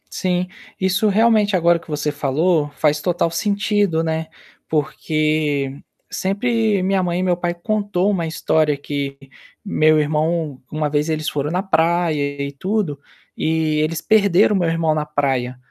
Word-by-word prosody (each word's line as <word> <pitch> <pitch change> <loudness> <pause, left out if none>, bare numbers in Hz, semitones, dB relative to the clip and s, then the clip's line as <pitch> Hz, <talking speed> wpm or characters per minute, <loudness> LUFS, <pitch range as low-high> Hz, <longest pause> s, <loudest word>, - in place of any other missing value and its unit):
Sim, 180 -1 -1 0.3
isso 190 +3 +1
realmente, 210 -1 +3
agora 170 -1 +3
que - - -20
você 150 -1 -2
falou, 150 +2 +1
faz 150 -1 +1
total 175 -1 0
sentido, 200 -2 0
né, 160 0 -2 0.4
porque 150 -2 -1 0.3
sempre 215 0 0
minha 190 0 +1
mãe 175 -1 -1
e - - 0
meu 180 -2 +1
pai 175 0 -1
contou 200 +1 -1
uma 170 -5 -1
história 155 -1 +1
que 140 -1 -4 0.5
meu 155 -6 +3
irmão, 155 -1 -1
uma 155 -1 -1
vez 145 +1 0
eles 155 -1 -1
foram 145 0 -2
na 180 +2 -1
praia 160 -5 +1
e 140 0 -3
tudo, 180 0 -2 0.4
e 160 -1 0
eles 155 +1 -1
perderam 205 -1 +4
meu 180 -3 +1
irmão 165 -1 +1
na 155 -1 -1
praia, 135 -4 -1
160 Hz, 150 wpm, -20 LUFS, 150-185 Hz, 0.5 s, perderam